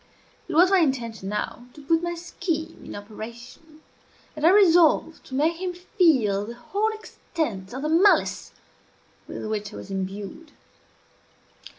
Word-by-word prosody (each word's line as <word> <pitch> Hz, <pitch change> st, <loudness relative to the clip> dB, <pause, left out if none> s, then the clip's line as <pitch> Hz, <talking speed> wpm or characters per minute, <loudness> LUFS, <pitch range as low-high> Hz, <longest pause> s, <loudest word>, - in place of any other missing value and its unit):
It 345 Hz, -, -4 dB
was 360 Hz, +4 st, +6 dB
my 385 Hz, -, +6 dB
intention, 235 Hz, -, -1 dB
now, 230 Hz, +3 st, -4 dB
to 295 Hz, -, -12 dB
put 325 Hz, +3 st, +2 dB
my 345 Hz, 0 st, -2 dB
scheme 335 Hz, -1 st, -4 dB
in -, -, -8 dB
operation, 235 Hz, +9 st, -10 dB, 0.5 s
and 305 Hz, -, -7 dB
I 330 Hz, -, +7 dB
resolved 345 Hz, -4 st, +4 dB
to 260 Hz, -, -6 dB
make 320 Hz, +4 st, +1 dB
him 365 Hz, -1 st, -2 dB
feel 275 Hz, -, +2 dB
the 235 Hz, -, -7 dB
whole 405 Hz, -, -1 dB
extent 310 Hz, -, -5 dB
of 260 Hz, +3 st, -6 dB
the 305 Hz, -, -1 dB
malice 355 Hz, +6 st, +3 dB, 0.8 s
with -, -, -6 dB
which 210 Hz, -1 st, -3 dB
I -, -, -9 dB
was -, -, -9 dB
imbued. 195 Hz, -, -6 dB
305 Hz, 150 wpm, -25 LUFS, 220-345 Hz, 0.8 s, I